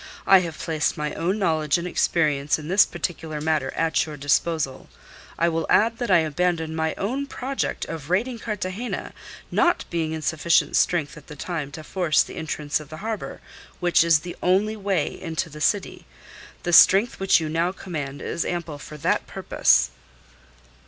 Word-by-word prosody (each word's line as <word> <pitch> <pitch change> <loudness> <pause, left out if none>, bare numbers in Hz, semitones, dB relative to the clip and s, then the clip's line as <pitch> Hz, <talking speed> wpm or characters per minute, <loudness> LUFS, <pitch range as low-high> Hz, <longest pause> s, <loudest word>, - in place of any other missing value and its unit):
I 195 -1 +7
have 170 -3 -5
placed 155 -2 -1
my 150 0 -3
own 180 +5 -1
knowledge 160 -7 +1
and 170 +1 -4
experience 150 -5 +1
in 155 0 -8
this 190 +3 +5
particular 160 -2 -4
matter 150 -3 0
at 165 -1 +1
your 155 -2 -7
disposal. 145 0 0 0.5
I 170 - +2
will 165 -1 -1
add 230 +2 +3
that 240 - -2
I 175 -3 +6
abandoned 160 0 -1
my 160 0 -1
own 260 +8 -2
project 270 0 -3
of 160 -2 -7
raiding 230 +7 0
Cartagena, 210 +1 -4 0.4
not 350 -1 +2
being 160 -2 -1
in 160 -1 -5
sufficient 160 +2 +2
strength 160 -6 +1
at 150 - -14
the 150 - -9
time 155 -1 -4
to 155 - -8
force 170 -1 +2
the - - -10
entrance 150 -2 -2
of 150 -2 -12
the 155 - -8
harbour, 220 -2 -4 0.4
which 175 -2 +4
is 165 -2 +4
the 175 +1 -7
only 200 +4 +2
way 195 -7 -2
into 165 -2 -3
the 150 +1 -10
city. 200 +4 -1 0.6
The 175 - -2
strength 195 +7 +6
which 195 -2 +4
you 160 - -3
now 165 +3 0
command 150 -8 -6
is 170 - -2
ample 170 -4 -4
for 150 +2 -10
that 140 - 0
purpose." 60 0 +2
165 Hz, 175 wpm, -24 LUFS, 155-185 Hz, 0.6 s, I